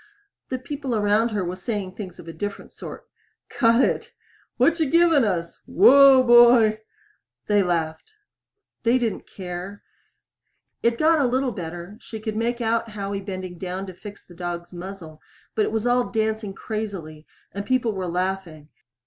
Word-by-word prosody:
_" - - -52
The 255 - -2
people 270 -1 -4
around 210 +2 +2
her 205 -4 -2
were 175 +1 -3
saying 190 -1 -4
things 185 -4 -8
of 165 - -12
a 165 - -7
different 205 +2 -6
sort. - - -10 0.4
"Cut 230 0 +3
it!" - - -3 0.4
"What 335 +1 +3
you 315 -4 +1
givin' 330 -3 +4
us?" 170 -5 -2
"Whoa, 275 -1 +7
boy!" 240 -3 +6 0.7
They 205 -1 +3
laughed. 170 - -2 0.7
They 240 +2 +3
didn't 230 -5 -2
care. 185 +2 -7 1.0
It 235 0 +2
got 315 +2 +4
a 280 - +3
little 260 +1 0
better; 175 +2 -7
she 220 - -8
could 220 0 -4
make 235 +2 -1
out 230 0 0
Howie 200 -1 -4
bending 185 -3 -6
down 185 +1 -4
to 185 - -8
fix 200 +2 -11
the 175 - -15
dog's 175 0 -6
muzzle 175 -4 -9 0.3
but 215 -2 +1
it - - -3
was 220 0 -1
all 245 0 +2
dancing 220 -3 -2
crazily 190 -10 -6 0.2
and 200 - -5
people 245 +1 +1
were 190 -2 -3
laughing. 175 -4 -3
205 Hz, 165 wpm, -23 LUFS, 180-240 Hz, 1.0 s, Whoa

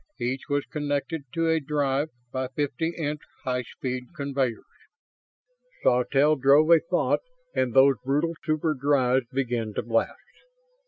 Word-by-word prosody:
Each 130 +4 -3
was 145 0 0
connected 145 +1 -3
to 165 -1 0
a 160 0 +3
drive 145 0 0 0.2
by 130 0 -2
fifty 145 +4 -2
inch 150 -2 -3 0.2
high 125 -2 -1
speed 125 +4 -6
conveyors. 135 -5 -2 1.2
Sawtelle 135 +5 +3
drove 140 +4 +5
a 165 - +8
thought 170 +3 +1 0.3
and 130 - 0
those 135 -1 +6
brutal 145 +5 0
super 155 0 0
drives 130 -3 +2
began 120 -5 -2
to - - -1
blast. 115 0 0
140 Hz, 130 wpm, -26 LUFS, 130-150 Hz, 1.2 s, a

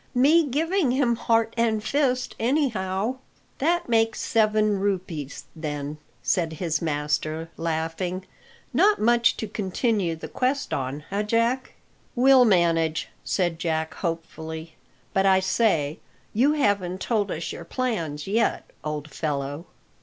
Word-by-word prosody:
"Me 300 +6 +5
giving 325 +4 +1
him 250 -2 +2
heart 225 0 +1
and 225 -2 +1
fist, 255 -2 0
anyhow." 230 -4 0 0.4
"That 345 +5 +1
makes 225 -1 +2
seven 215 -2 +2
rupees, 180 -8 -3
then," 150 -1 -4 0.2
said 165 -3 +1
his 160 -1 -1
master, 155 +1 -1
laughing; 165 +3 -2 0.5
"not 420 +1 +4
much 235 +1 +3
to 220 - -3
continue 200 -3 0
the 160 - -8
quest 270 +3 -1
on, 135 +2 -3
eh, 200 +1 0
Jack?" 230 +4 0 0.4
"We'll 260 0 +6
manage," 165 -5 +2
said 175 -4 0
Jack 160 -2 -1
hopefully. 160 -1 -5 0.4
"But, 195 0 +3
I 190 -1 +5
say, 185 -6 +1 0.3
you 265 +7 +4
haven't 200 -10 +1
told 210 -2 0
us 165 - -3
your - - -7
plans 170 - -2
yet, 220 +3 0 0.2
old 150 0 -4
fellow." 145 +1 -3
195 Hz, 125 wpm, -25 LUFS, 160-235 Hz, 0.5 s, We'll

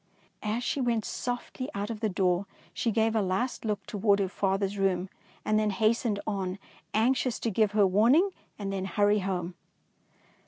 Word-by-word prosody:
As 220 +3 -2
she 275 - -1
went 235 -3 +1
softly 245 +1 -4
out 205 +3 -2
of 220 - -5
the 220 -1 0
door, 185 0 +1 0.3
she 235 - 0
gave 225 0 +2
a 220 - +3
last 195 +7 -1
look 210 -2 -2
toward 205 -1 +2
her 200 -1 0
father's 195 +1 0
room 190 -1 +1 0.4
and 215 0 +3
then 215 -1 +1
hastened 215 +1 +1
on, 195 -3 -2 0.3
anxious 245 +2 +2
to 230 - 0
give 210 0 +2
her 210 -2 +5
warning 240 - +4 0.3
and 195 -2 -4
then 190 -1 -2
hurry 205 +3 +2
home. 185 -2 -2
210 Hz, 170 wpm, -29 LUFS, 195-225 Hz, 0.4 s, her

